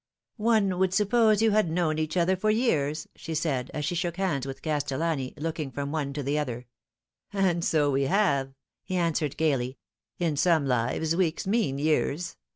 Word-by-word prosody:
" - - -58 0.2
One 195 -4 +2
would 185 -1 +2
suppose 215 0 +3
you 225 - +4
had 210 -5 +2
known 160 -2 0
each 155 +3 -2
other 180 +2 +3
for 215 +4 0
years," 155 - +1
she 160 - -6
said, 140 -5 -1
as 150 -1 -3
she - - -1
shook 175 0 -2
hands 155 -9 -1
with 135 - -7
Castellani, 150 -2 -1
looking 155 -1 -3
from 140 +1 -4
one 150 -3 -2
to 145 0 -4
the 145 +3 0
other. 125 -4 -4 0.4
" - - -66 0.3
And 185 -4 +1
so 150 -3 +2
we 135 0 +1
have,' 140 -6 +1 0.2
' - - -64
he 185 - -4
answered 165 -5 0
gaily. 135 -5 0 0.2
'* - - -66
In 165 -4 -1
some 160 -2 +3
lives 130 +6 0
weeks 170 -3 0
mean 195 - +1
years. 155 +2 0
160 Hz, 195 wpm, -27 LUFS, 140-185 Hz, 0.4 s, you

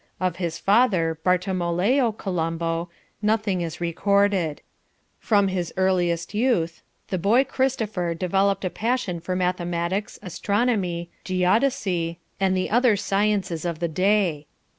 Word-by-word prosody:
Of 185 -2 -1
his 170 -2 -3
father, 185 -7 +2
Bartolomeo 185 +7 +1
Colombo, 165 -3 -2 0.3
nothing 210 -3 +1
is 165 -2 -4
recorded. 185 -1 +1 0.6
From 200 -3 +3
his 180 -3 -2
earliest 175 -2 +1
youth 210 -8 0 0.3
the 185 - -1
boy 220 +9 +4
Christopher 220 -10 -1
developed 195 +3 +1
a 185 - -1
passion 225 -6 -1
for 180 +2 -3
mathematics, 180 +1 -1
astronomy, 190 -3 -1
geodesy, 185 -3 +1 0.2
and 190 -1 +2
the 185 - -2
other 240 -1 +4
sciences 195 -4 0
of 170 -2 -2
the 170 +1 -1
day..." 180 -3 +1
185 Hz, 120 wpm, -24 LUFS, 170-205 Hz, 0.6 s, boy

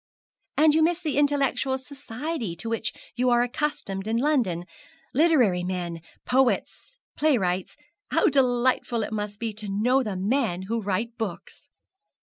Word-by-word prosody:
'And 305 0 +6
you 320 - +4
miss 335 +2 +2
the 315 -5 -2
intellectual 280 -2 +1
society 265 - -5
to 200 - -5
which 225 -1 -1 0.2
you 250 +1 +2
are 240 0 +4
accustomed 245 -7 -3
in 225 +1 +1
London 235 - +1 0.5
literary 250 - +3
men 175 -2 -3 0.2
poets 265 - 0 0.2
playwrights. 190 -12 +1 0.3
How - - +3
delightful 245 -3 +2
it 215 - -5
must 210 -1 -3
be 230 -2 -3
to 210 -1 -6
know 240 +7 +2
the 210 -6 -3
men 200 -2 0
who 225 +4 -2
write 220 +4 -2
books!' 210 -6 -6
240 Hz, 140 wpm, -26 LUFS, 200-275 Hz, 0.5 s, And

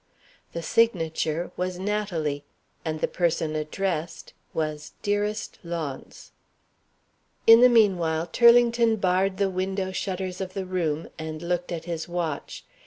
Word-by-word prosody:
The 170 - -4
signature 165 -6 +1
was 180 0 -2
"Natalie," 180 -8 -2 0.4
and 155 -1 -3
the - - +2
person 160 -3 0
addressed 165 +1 -3 0.2
was 155 -1 -3
"Dearest 205 +1 -1
Launce." 165 -6 -6 1.1
In 225 +1 +9
the 250 - +8
meanwhile, 175 -8 +3
Turlington 235 +3 +5
barred 190 -1 +1
the 200 0 +2
window 190 +1 -2
shutters 185 -1 -3
of 185 -1 -5
the 195 -1 -3
room, 165 -4 -1
and 160 0 -5
looked 175 +1 -2
at 165 -1 -4
his 165 -2 -4
watch. 170 -4 -4
180 Hz, 125 wpm, -26 LUFS, 160-195 Hz, 1.1 s, In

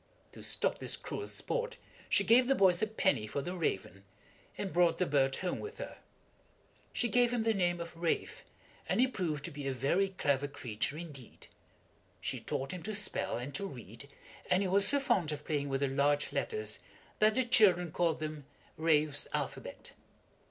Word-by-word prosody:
To - - -12
stop - - -1
this - - 0
cruel 415 - -5
sport 485 -1 -2 0.3
she - - +4
gave 245 +2 +5
the 270 - +4
boys 185 -5 +4
a 220 - +2
penny 190 - +1
for 140 +6 -3
the 180 +4 -4
raven, 100 - -2 0.5
and 195 - -4
brought 170 -1 +4
the 180 - +2
bird 135 -3 +2
home 180 -1 -2
with 430 +2 -7
her. - - -7 0.9
She 240 - 0
gave 245 +1 +3
him 240 -2 0
the 225 0 +2
name 175 -3 +1
of 170 0 -7
"Ralph," 165 0 -2 0.5
and - - +1
he 255 - +7
proved 165 - -2
to 175 - -4
be 145 -2 -5
a - - 0
very 155 +10 +1
clever 145 -7 0
creature 130 0 -3
indeed. 150 -7 -10 0.7
She - - -3
taught 135 +1 -3
him 180 - -6
to 215 +4 -2
spell, 205 - 0
and 125 +4 -6
to 195 +9 -2
read, 120 - -10 0.4
and 185 +2 +3
he - - 0
was 200 +2 +4
so 285 - +5
fond 180 - +1
of 150 0 -5
playing 145 -3 -1
with 135 0 -1
the 140 - +3
large 145 +2 +1
letters, 435 -2 -1 0.4
that 215 0 +5
the 260 -1 +2
children 180 -8 +5
called 165 -1 +1
them 155 -2 -5 0.3
"Ralph's 155 -2 +2
Alphabet." - - -4
170 Hz, 185 wpm, -32 LUFS, 140-205 Hz, 0.9 s, he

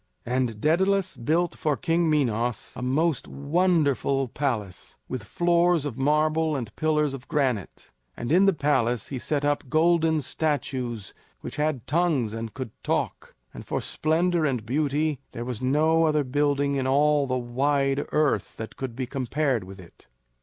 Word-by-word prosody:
And 125 -3 -1
Daedalus 190 - +2
built 160 +8 0
for 150 -3 -1
King 165 +6 +1
Minos 120 -5 0
a - - -6
most 145 +3 0
wonderful 140 -4 +1
palace 115 -9 -3
with 130 -5 -5
floors 175 - +2
of 140 -6 -4
marble 155 +3 +1
and 120 -6 -5
pillars 150 -2 +1
of 130 -2 -8
granite; 130 - -2 0.3
and 120 - -4
in 190 +4 +5
the 195 - +5
palace 130 -7 0
he 135 - -4
set 145 +2 -1
up 145 -2 0
golden 160 +1 +3
statues 130 -9 -2 0.3
which - - -7
had 150 -5 -1
tongues 150 -9 +1
and 115 -1 -6
could 130 -5 -5
talk; - - -2 0.2
and - - -8
for - - -2
splendor 170 +2 +1
and 125 -7 -1
beauty 145 +3 0
there 120 - -5
was 125 -2 -4
no 155 +5 +3
other 150 -2 +2
building 140 +1 +1
in 130 -1 -1
all 145 +1 +3
the 130 0 0
wide 135 +3 0
earth 150 -2 0
that 110 - -7
could 130 -3 -5
be 130 +1 -2
compared 130 -1 -1
with 95 +1 -11
it. 85 -3 -16
140 Hz, 160 wpm, -26 LUFS, 125-155 Hz, 0.3 s, in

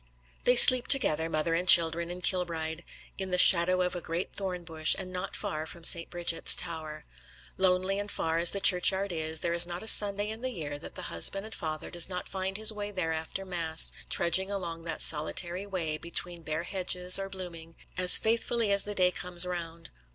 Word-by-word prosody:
They 245 - +3
sleep 250 0 +8
together, 165 - +2
mother 155 +1 -3
and 175 +2 -3
children, 170 0 +6
in 180 +1 -9
Kilbride, 170 -3 -3 0.4
in 190 -1 -5
the 180 - -2
shadow 180 0 +4
of 180 0 -4
a 175 - -6
great 170 +3 -6
thorn 185 -3 -5
bush, 160 -2 0
and 185 -1 -9
not 180 - -7
far 155 +1 -6
from 170 0 -12
St. 170 0 0
Brigid's 175 -1 +2
Tower. 155 -2 -8 0.5
Lonely 185 +1 -1
and 205 0 -6
far 165 -4 -3
as 170 0 +6
the 200 - -4
churchyard 190 +1 +3
is, 160 -1 -4
there 170 - -3
is 170 0 +2
not 175 +2 -8
a - - -11
Sunday 205 -1 +4
in 220 +1 -9
the 255 - -4
year 150 - -8
that - - -11
the - - -7
husband 195 - 0
and 220 - -9
father 155 -3 -7
does 175 0 +2
not 180 -1 -7
find 190 0 -5
his 220 0 0
way 205 -1 -6
there 180 -5 -4
after 160 +4 -7
mass, 165 -3 -1 0.2
trudging 185 +3 0
along 170 -4 -7
that 165 -1 -5
solitary 175 +5 -1
way, 165 -6 -5
between 170 0 0
bare 155 +1 -5
hedges 180 0 +1
or 195 0 -6
blooming, 170 -4 -11 0.2
as 180 0 +8
faithfully 230 -1 -2
as 200 0 +2
the 205 0 -7
day 180 -1 +1
comes 180 0 -3
round. 170 -2 -8
180 Hz, 205 wpm, -27 LUFS, 165-190 Hz, 0.5 s, sleep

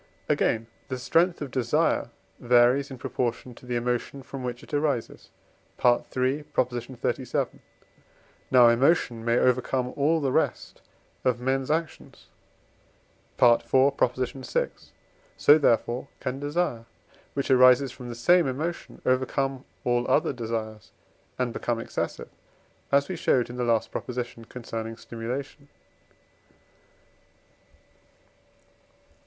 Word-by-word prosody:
Again, 115 0 +1 0.2
the 130 - -3
strength 170 +6 +1
of 135 - -7
desire 130 +2 +1 0.3
varies 125 +3 +4
in 135 - -8
proportion 120 0 -3
to 125 - -16
the 125 - -2
emotion 125 +3 -2
from 135 0 -8
which 125 -1 -5
it - - -15
arises 145 -5 -2 0.6
(III. 130 +3 +2
xxxvii.). 125 +1 -2 0.9
Now 125 -2 +7
emotion 120 -2 +2
may 115 +1 +2
overcome 125 0 +1
all 155 +3 +2
the 140 -3 0
rest - - -1 0.4
of 125 -2 +1
men's 130 +1 -1
actions 160 +1 -4 1.1
(IV. 120 -1 +6
vi.); 135 - +1 0.7
so, 145 - +7
therefore, 120 -1 +1
can 130 +1 -4
desire, 145 -5 -2 0.5
which 140 -1 -1
arises 130 +1 +6
from 125 -1 -9
the 120 - -6
same 170 +7 +4
emotion, 155 +7 -4
overcome 130 +1 0 0.2
all 120 0 +1
other 150 - +2
desires, 110 -3 -5 0.5
and 125 -2 -1
become 120 -1 -2
excessive, 115 - -4 0.6
as 140 0 +3
we 185 - -4
showed 125 -7 +1
in - - -8
the 125 - -2
last 115 -2 +1
proposition 120 -2 -5
concerning 115 -2 -6
stimulation. 130 +6 -6
125 Hz, 115 wpm, -26 LUFS, 120-140 Hz, 1.1 s, Now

